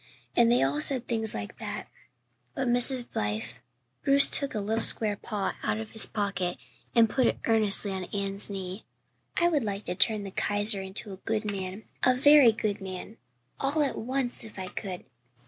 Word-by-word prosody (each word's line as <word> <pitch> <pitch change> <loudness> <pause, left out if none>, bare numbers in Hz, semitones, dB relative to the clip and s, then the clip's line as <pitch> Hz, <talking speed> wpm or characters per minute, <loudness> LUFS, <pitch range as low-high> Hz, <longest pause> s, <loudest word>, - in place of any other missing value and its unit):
And 235 -1 +3
they 240 - +2
all 140 +2 -1
said 260 - 0
things 225 -2 +1
like 100 -1 -8
that. - - -6 0.7
But 260 - -3
Mrs. 245 +1 +2
Blythe" 110 +3 -5 0.4
Bruce 280 0 +6
took 280 -4 +2
a - - -1
little 220 +3 -2
square 215 -1 +6
paw 205 -1 -4
out 105 - -2
of 110 - -8
his 220 - +1
pocket 200 -4 -3 0.4
and 230 -1 +5
put 255 +2 0
it - - -1
earnestly 215 -3 +4
on 190 -1 -5
Anne's 200 +1 -3
knee 190 0 -7 0.6
"I 345 - +3
would 305 -6 0
like 200 -1 -5
to 180 - -3
turn 205 +3 +2
the 195 - -8
Kaiser 205 0 +4
into 190 +1 -2
a - - -10
good 215 +1 -3
man 190 +1 -7 0.2
a 255 - +3
very 285 -2 +6
good 215 -1 -4
man 190 +3 -8 0.4
all 285 +3 0
at 275 - -2
once 255 +1 -3
if 220 -2 -12
I 185 -1 -6
could. 185 -3 -7
210 Hz, 185 wpm, -27 LUFS, 190-240 Hz, 0.7 s, Bruce